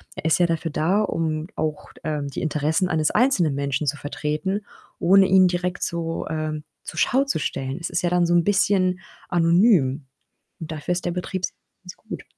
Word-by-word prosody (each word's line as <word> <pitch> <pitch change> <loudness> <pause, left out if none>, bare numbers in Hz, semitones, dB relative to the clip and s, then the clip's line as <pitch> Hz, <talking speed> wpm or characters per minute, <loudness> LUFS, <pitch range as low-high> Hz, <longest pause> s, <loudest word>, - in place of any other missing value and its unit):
Er - - -8
ist 160 +1 +3
ja 175 - +5
dafür 165 -1 -1
da, 185 +8 +1
um 160 -4 -1
auch 155 -1 -4
d - - -18
ähm, 150 -2 -2
die 140 - -5
Interessen 155 +3 0
eines 155 -1 +1
einzelnen 195 - +2
Menschen 140 +1 -1
zu 145 - +1
vertreten, 150 +8 -3 0.4
ohne 190 +2 +5
ihn 185 -1 +6
direkt 180 0 -2
so, 165 -2 -3
ähm, 155 -1 -3 0.2
zur 160 - -6
Schau 265 - +3
zu 275 - -1
stellen. 135 0 -3
Es - - -3
ist - - -1
ja 175 - +2
dann 175 -1 +3
so 175 - +2
'n 170 - +4
bisschen 190 -2 +2 0.3
anonym 165 - +3 0.5
und 160 -1 -7
dafür 155 +3 -4
ist 180 0 -1
der 175 - 0
Betriebsrat 180 +1 -3 0.3
ganz 180 - -10
gut. - - -8
165 Hz, 195 wpm, -23 LUFS, 155-185 Hz, 0.5 s, ihn